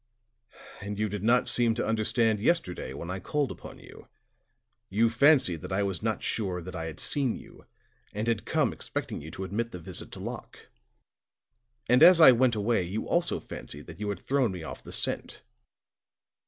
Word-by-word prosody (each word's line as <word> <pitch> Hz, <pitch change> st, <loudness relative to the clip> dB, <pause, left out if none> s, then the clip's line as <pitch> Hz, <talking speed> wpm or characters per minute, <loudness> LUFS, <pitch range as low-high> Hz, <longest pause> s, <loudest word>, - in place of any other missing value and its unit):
"And 100 Hz, 0 st, -5 dB
you 110 Hz, +1 st, 0 dB
did 105 Hz, -1 st, -4 dB
not 120 Hz, +3 st, +3 dB
seem 120 Hz, -2 st, +3 dB
to 120 Hz, -, -1 dB
understand 110 Hz, 0 st, +2 dB
yesterday 100 Hz, -, 0 dB
when 85 Hz, +6 st, -6 dB
I 95 Hz, -, -4 dB
called 145 Hz, +5 st, -1 dB
upon -, -, -10 dB
you. -, -, -15 dB, 0.8 s
You 110 Hz, +4 st, +2 dB
fancied 125 Hz, -, +4 dB
that -, -, -8 dB
I 100 Hz, +2 st, +1 dB
was 95 Hz, -2 st, -2 dB
not 110 Hz, 0 st, -2 dB
sure 95 Hz, -5 st, -2 dB
that 90 Hz, +1 st, -8 dB
I 80 Hz, -1 st, -4 dB
had 80 Hz, -1 st, -7 dB
seen 135 Hz, -5 st, 0 dB
you, -, -, -14 dB, 0.4 s
and 105 Hz, +2 st, -4 dB
had 115 Hz, -3 st, 0 dB
come -, -, 0 dB
expecting -, -, -5 dB
you 75 Hz, -, -9 dB
to 95 Hz, +4 st, -7 dB
admit 110 Hz, +5 st, -3 dB
the 90 Hz, -, -7 dB
visit 80 Hz, -, -5 dB
to -, -, -7 dB
Locke. -, -, -8 dB, 1.2 s
And 125 Hz, +1 st, +4 dB
as 180 Hz, -1 st, +9 dB
I 155 Hz, -, +10 dB
went 125 Hz, -1 st, +3 dB
away, 110 Hz, 0 st, +1 dB
you 95 Hz, +5 st, -4 dB
also 170 Hz, 0 st, +1 dB
fancied 75 Hz, +1 st, -9 dB
that 85 Hz, +1 st, -11 dB
you 105 Hz, -1 st, -3 dB
had 100 Hz, -, -3 dB
thrown 135 Hz, -5 st, 0 dB
me 90 Hz, -3 st, -7 dB
off -, -, -8 dB
the -, -, -11 dB
scent." -, -, -1 dB
105 Hz, 190 wpm, -28 LUFS, 95-120 Hz, 1.2 s, I